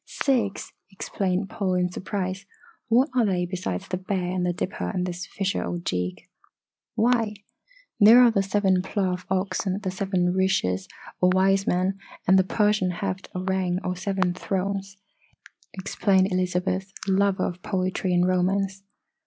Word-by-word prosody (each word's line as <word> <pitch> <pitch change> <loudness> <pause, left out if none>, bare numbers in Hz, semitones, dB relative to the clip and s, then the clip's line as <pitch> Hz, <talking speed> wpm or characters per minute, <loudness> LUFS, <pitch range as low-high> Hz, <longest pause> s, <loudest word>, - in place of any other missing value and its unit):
"Six!" 235 -8 -1 0.2
exclaimed 195 -1 -2
Paul 190 -3 -1
in 180 0 +1
surprise. 190 0 -4 0.4
"What 250 +6 +4
are 245 - +4
they 185 -4 +1
besides 175 - -4
the 185 - -2
Bear 185 -1 -2
and 185 -1 -1
the 180 - +1
Dipper 180 +2 -3
and 180 -3 -1
this 180 0 -5
Fisher 195 -1 -2
Ojeeg?" 90 - -3 0.7
"Why, 230 -2 +2 0.6
there 220 +3 +9
are 240 - +6
the 200 -3 +2
Seven 195 -1 +2
Plough 190 -1 -1
Oxen, 190 0 -1
The 190 -3 -3
Seven 185 -2 0
Rishis, 185 - +1 0.3
or 180 - +4
Wise 195 +1 +3
Men, 185 +2 +1 0.3
and 190 +1 +6
the - - +5
Persian 210 -1 +1
Heft 185 +1 -4
Aurang 185 -1 0
or 180 - -2
Seven 190 -1 0
Thrones," 195 +1 -3 0.8
explained 190 0 +1
Elizabeth, 185 +1 -1
the 195 - 0
lover 200 0 +2
of 180 +1 -5
poetry 185 -2 -1
and 175 0 +3
romance. 190 +1 0
190 Hz, 145 wpm, -25 LUFS, 180-195 Hz, 0.8 s, there